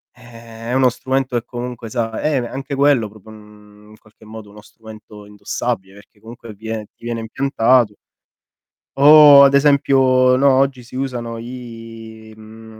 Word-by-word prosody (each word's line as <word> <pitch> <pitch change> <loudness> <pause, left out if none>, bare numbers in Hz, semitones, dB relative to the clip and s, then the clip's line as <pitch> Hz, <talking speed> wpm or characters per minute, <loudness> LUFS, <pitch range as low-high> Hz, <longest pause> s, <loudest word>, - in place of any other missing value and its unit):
Eh 115 -2 -16 0.2
è - - -2
uno 130 -1 +3
strumento 130 0 -3
che 120 - -17
comunque 120 -2 -8
sa 115 -2 -4
eh, 150 -1 -1
anche 135 +2 -7
quello 135 -6 +1
proprio, 110 +1 -17
uhm, 105 0 -18
in 110 - -17
qualche 110 0 -22
modo 110 -1 -12
uno 105 +1 -15
strumento 110 -1 -15
indossabile 100 0 -5
perché 100 +1 -20
comunque 115 0 -12
vie 110 +1 -7
ti 115 - -17
viene 115 -1 -4
impiantato 120 -2 0 1.0
o 145 0 +8
ad 140 0 +3
esempio 135 -3 +3
no, 140 0 +3
oggi 135 -1 0
si 120 - -17
usano 120 -4 -5
i, 115 -2 -11
mhmm, 110 0 -15
115 Hz, 155 wpm, -18 LUFS, 110-130 Hz, 1.0 s, o